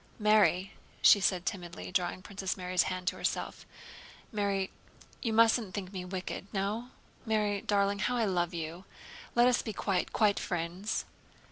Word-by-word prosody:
"Mary," 205 -4 +3 0.3
she 205 - +8
said 185 -2 +1
timidly, 175 -5 -5
drawing 180 0 -1
Princess 195 -1 -3
Mary's 180 -1 +1
hand 185 -1 -4
to - - +1
herself, - - -3 0.6
"Mary, 200 -3 0 0.5
you 230 - -1
mustn't 225 -2 +4
think 195 -1 -5
me 185 -2 -4
wicked. 185 +1 -5
No? 210 +5 -2 0.3
Mary 210 -3 0
darling, 200 -1 +1
how 245 +5 0
I 230 - +2
love 175 -3 0
you! 170 +2 -5 0.5
Let 240 +1 +6
us 250 - +3
be 220 - -5
quite, 190 -3 -1
quite 210 -2 +3
friends." 175 +4 -2
195 Hz, 150 wpm, -31 LUFS, 180-210 Hz, 0.6 s, she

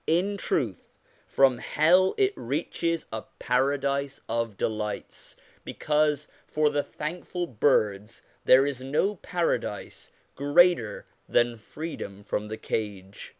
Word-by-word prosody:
In 185 +5 +2
truth, 120 - -2 0.3
from 130 -3 +3
hell 180 +5 +3
it 400 0 +3
reaches 165 -1 -2
a 110 - -3 0.2
paradise 140 +2 0
of 115 -3 -2
delights, 105 -2 -4 0.3
because 150 -1 0 0.2
for 150 -1 +2
the 145 0 +1
thankful 175 +4 -5
birds 105 - 0 0.2
there 130 +2 +7
is 140 -3 -2
no 155 +10 0
paradise 175 0 -3 0.2
greater 145 - +3 0.2
than 120 0 +3
freedom 110 -5 -7
from 105 +1 -3
the 110 +1 -5
cage. 100 -3 -5
140 Hz, 110 wpm, -27 LUFS, 110-160 Hz, 0.3 s, there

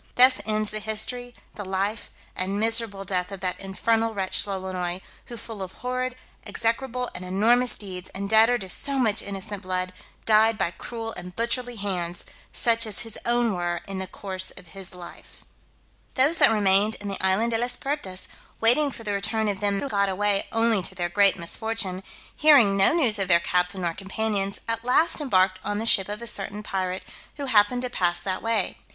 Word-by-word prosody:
Thus 255 +1 +6
ends 215 -1 0
the 215 - -1
history, 220 +3 -3 0.2
the 205 - -7
life, 195 +3 -3 0.3
and 195 +2 -1
miserable 225 -3 +2
death 180 0 -1
of 195 - -6
that 185 -1 -2
infernal 225 +3 -1
wretch 190 +1 +1
Lolonois, 185 -2 -3 0.3
who 240 - -9
full 220 -2 -8
of 185 -1 -6
horrid, 255 0 -3 0.3
execrable, 250 +2 -2
and 180 - -7
enormous 230 +7 +3
deeds, 185 -3 -7
and 200 +1 -4
debtor 220 +3 +5
to 195 - -5
so 280 +6 0
much 220 -4 +3
innocent 200 0 -5
blood, 185 -1 -2 0.3
died 220 0 +4
by 170 - 0
cruel 225 +3 -7
and 180 0 -9
butcherly 245 +1 -1
hands, 180 -4 -3 0.3
such 230 -1 +1
as 215 - -2
his 225 -3 -5
own 240 -2 +2
were 175 -1 -2
in 195 -1 -4
the 190 - -3
course 190 -2 -4
of 175 - -8
his 190 -1 -9
life. 175 -1 -13 0.7
Those 290 +5 +3
that - - +8
remained 210 0 +4
in 205 - -9
the 195 -1 -3
island 195 +5 +2
De 225 - 0
las 245 +1 -2
Pertas, 270 -11 -5 0.3
waiting 250 +6 +5
for 235 - -10
the 205 -2 -2
return 220 +2 -1
of 200 -2 -2
them 200 -1 0
who - - -3
got 200 -5 0
away 200 +1 0
only 225 -2 +3
to 185 +2 -5
their 175 -1 -2
great 200 +2 +3
misfortune, 190 +1 -3 0.3
hearing 280 -10 +6
no 195 0 +7
news 255 -11 +3
of 195 - 0
their 170 -2 +5
captain 180 +2 -1
nor 170 -2 -1
companions, 195 +1 -1
at 230 0 -3
last 310 +7 +2
embarked 185 -8 +2
on 205 - -3
the 220 - -3
ship 195 -4 +3
of 210 +3 -5
a - - -5
certain 210 -2 -3
pirate, 185 -2 -3 0.3
who 285 - -4
happened 245 0 +3
to 250 - -3
pass 175 -5 +1
that 185 -1 -3
way. 225 -4 -1
205 Hz, 195 wpm, -25 LUFS, 190-230 Hz, 0.7 s, that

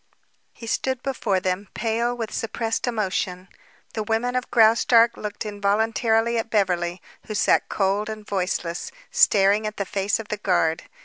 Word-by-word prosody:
He 230 - -11
stood 260 +2 -2
before 225 -8 0
them, 185 +2 -2
pale 235 +2 -1
with 225 -3 -4
suppressed 225 +1 -2
emotion. 190 -5 -2 0.4
The 220 - -2
women 225 +3 -1
of 255 0 -2
Graustark 230 +1 +5
looked 210 +1 -6
involuntarily 220 +3 +1
at 225 - -4
Beverly, 180 -4 0 0.2
who 215 - -4
sat - - +2
cold 200 +2 0
and 215 -1 -7
voiceless, 180 - -2 0.2
staring 205 +1 +4
at 215 - -6
the 200 - -2
face 200 +3 -1
of 220 - -8
the 210 - -2
guard. 170 -5 0
215 Hz, 150 wpm, -23 LUFS, 195-225 Hz, 0.4 s, Graustark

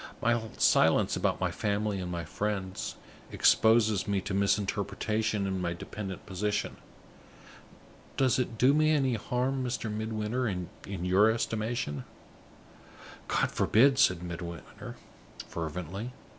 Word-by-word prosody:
My 120 0 +2 0.2
silence - - +4
about - - 0
my - - 0
family 105 -1 -1
and 90 -1 -4
my 85 -1 -4
friends 95 +1 -3 0.4
exposes 110 -3 +4
me 100 -1 +1
to 100 +1 -5
misinterpretation 100 +1 0
in 95 -1 -2
my 85 -1 -1
dependent 95 +2 -7
position. 100 +2 -2 1.4
Does 130 -2 +3
it 120 -2 -2
do 130 +5 +5
me 155 +1 +3
any 135 -5 +2
harm, 125 +4 -1
Mr. 120 -3 -3
Midwinter, 110 +3 -2
in 90 -4 -3 0.4
your 95 +4 +5
estimation?" 110 - -2 1.2
"God - - +1
forbid!" 135 +4 +4
said 90 -11 +4
Midwinter, 85 -1 -7 0.5
fervently. 90 +8 -5
105 Hz, 115 wpm, -29 LUFS, 95-120 Hz, 1.4 s, do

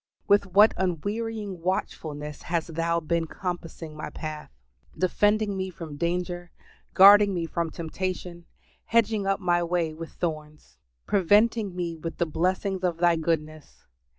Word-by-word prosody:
With 200 0 +4
what 205 +4 +6
unwearying 200 +2 -3
watchfulness 150 -4 -3
has 170 -1 -1
Thou 170 +1 -1
been 165 +1 -1
compassing 165 -3 -6
my 155 - -6
path! 155 -1 -7 0.5
defending 205 +2 +2
me 190 0 -3
from 165 -4 -8
danger, 175 +2 -2 0.5
guarding 200 +1 +8
me 170 -1 -1
from 165 0 -2
temptation, 170 +1 -5 0.4
hedging 220 -3 +2
up 195 0 +1
my 175 -2 +2
way 170 -2 -1
with 165 +1 -9
thorns, 155 -2 -6 0.3
"preventing 205 +1 +3
me 170 -2 -3
with 165 0 -6
the 170 - +1
blessings 185 +4 -1
of 175 -2 0
Thy 170 0 +4
goodness!" 155 -2 -3
175 Hz, 135 wpm, -26 LUFS, 165-195 Hz, 0.5 s, guarding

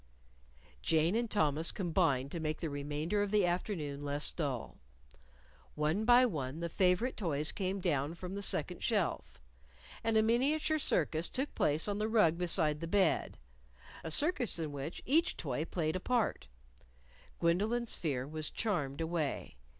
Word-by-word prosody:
Jane 165 +4 +2
and 235 0 0
Thomas 155 -5 +2
combined 160 -8 0
to 170 - -4
make 155 -1 -2
the 165 -3 -3
remainder 150 +7 -2
of 205 - 0
the 205 -2 +3
afternoon 170 -5 -2
less 145 +1 +1
dull. 140 -7 -4 1.0
One 155 +8 0
by 245 +1 +7
one 150 - -3
the 170 0 -3
favorite 185 +8 +2
toys 155 -7 0
came 195 0 -2
down 155 -3 -1
from 180 +2 -7
the 200 - -4
second 180 -2 -2
shelf. 205 -7 -1 0.6
And 225 -1 +2
a 220 - +5
miniature 290 +7 +2
circus 165 - +1
took 270 +2 -3
place 150 +5 +1
on 205 0 -2
the 215 +1 0
rug 210 -8 +4
beside 165 -4 +2
the 165 - -5
bed 190 -1 +1 0.7
a 160 - -4
circus 275 - +2
in 160 -3 -3
which 145 +4 -6
each 325 +7 +2
toy 145 0 -3
played 160 -2 -2
a - - -1
part. 240 +3 -1 0.9
Gwendolyn's 215 +8 +1
fear 135 -5 -2
was 155 0 -1
charmed 165 -10 -2
away. 160 -3 -2
170 Hz, 155 wpm, -33 LUFS, 150-210 Hz, 1.0 s, by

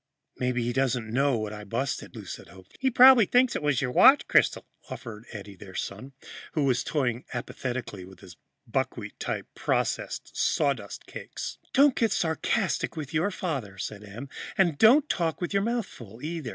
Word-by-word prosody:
"Maybe 125 -1 -1
he 120 +1 -1
doesn't 120 -4 0
know 135 0 +2
what 110 -1 -3
it 105 - -7
was - - -8
I - - -9
busted," 120 +7 -3
Lou - - -8
said - - -8
hopefully. 95 - -4
"Probably 250 -3 +8
thinks 250 +3 +3
it - - -1
was 145 -3 +1
your 125 - -1
watch 270 - +6
crystal," - - +3 0.2
offered 110 -1 -8
Eddie, 100 -2 -9
their 95 0 -12
son, 120 +8 -5 0.4
who 150 - +1
was 125 -3 +2
toying 125 -5 -1
apathetically 120 -5 -5
with 95 +1 -14
his 90 -2 -13 0.3
buckwheat - - -3
type - - -3
processed - - -2
sawdust 130 -9 0
cakes. - - -7
"Don't 280 0 +5
get 225 -3 +1
sarcastic 160 -3 0
with 145 -2 -6
your 165 +5 +2
father," 140 - -4
said 105 +1 -6
Em, 110 +7 -8 0.3
"and 175 -7 +2
don't 265 +7 +6
talk 165 - -1
with 175 +2 -3
your 200 - +3
mouth 235 +1 -1
full, 115 - -13
either." 160 -5 -4
130 Hz, 180 wpm, -27 LUFS, 110-175 Hz, 0.4 s, Probably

